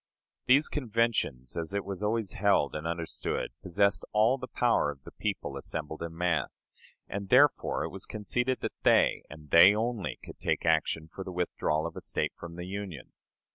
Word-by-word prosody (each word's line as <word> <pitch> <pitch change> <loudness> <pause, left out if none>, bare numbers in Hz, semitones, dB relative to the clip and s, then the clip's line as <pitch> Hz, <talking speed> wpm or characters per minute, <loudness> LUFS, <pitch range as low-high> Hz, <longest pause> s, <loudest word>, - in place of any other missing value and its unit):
These 140 +4 +5
conventions, 115 - -1
as 85 +4 -3
it 100 - -1
was 100 -1 -5
always 110 -1 0
held 100 -7 +2
and 75 +1 -4
understood, 85 0 -3
possessed 100 +2 +1
all 110 +5 +4
the 125 - -6
power 120 -14 +2
of 70 -2 -8
the - - -11
people - - -3
assembled 80 0 -5
in 85 0 -6
mass; 85 -6 -1 0.4
and 100 -1 -5
therefore 140 +5 +4
it - - -3
was - - -6
conceded 125 +4 -1
that - - -3
they, - - +4
and 75 -1 -12
they 90 +5 +8
only, 115 -3 -2
could - - -11
take - - -1
action 80 -1 +1
for 95 - -6
the 95 - -7
withdrawal 85 -3 -1
of 85 - -5
a - - -6
State - - -2
from 85 0 -9
the 90 0 -6
Union. 95 -6 -6
95 Hz, 180 wpm, -29 LUFS, 80-110 Hz, 0.4 s, they